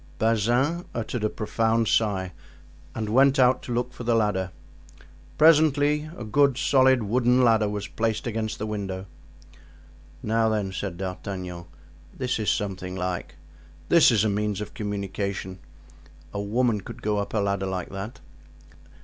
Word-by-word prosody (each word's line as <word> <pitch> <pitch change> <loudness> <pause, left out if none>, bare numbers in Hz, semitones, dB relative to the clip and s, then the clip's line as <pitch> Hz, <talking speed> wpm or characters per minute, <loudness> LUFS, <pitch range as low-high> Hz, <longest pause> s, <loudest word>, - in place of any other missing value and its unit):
Bazin 120 - +1
uttered 115 0 -3
a 105 - +2
profound 115 +1 0
sigh 95 -5 +1 0.6
and 110 -1 -3
went 135 +5 +4
out 130 0 +4
to - - -7
look 120 +1 -1
for 125 - -8
the 120 0 +2
ladder. 105 -4 +1 0.9
Presently 150 -1 +4
a - - -6
good, 140 +4 +2
solid, 130 -3 +4
wooden 125 +4 +3
ladder 110 -3 +4
was 105 -1 -4
placed 110 -1 -2
against 110 -2 -3
the 110 - -4
window. 100 -3 -4 1.2
"Now 110 +1 +2
then," 105 -3 -1
said 95 -2 -4
D'Artagnan, 90 -2 -5 0.5
"this 130 -2 -1
is 110 - 0
something 95 -2 -2
like; 90 -1 -4 0.5
this 170 -2 +7
is 110 -4 +3
a - - +2
means 105 -1 -1
of 105 - -6
communication. 100 -2 -4 0.7
A 100 - -2
woman 110 +1 +1
could - - -10
go 105 -1 0
up 100 +2 -4
a - - +2
ladder 100 -1 -1
like 95 -2 -4
that." 100 +3 -7
110 Hz, 150 wpm, -25 LUFS, 100-125 Hz, 1.2 s, this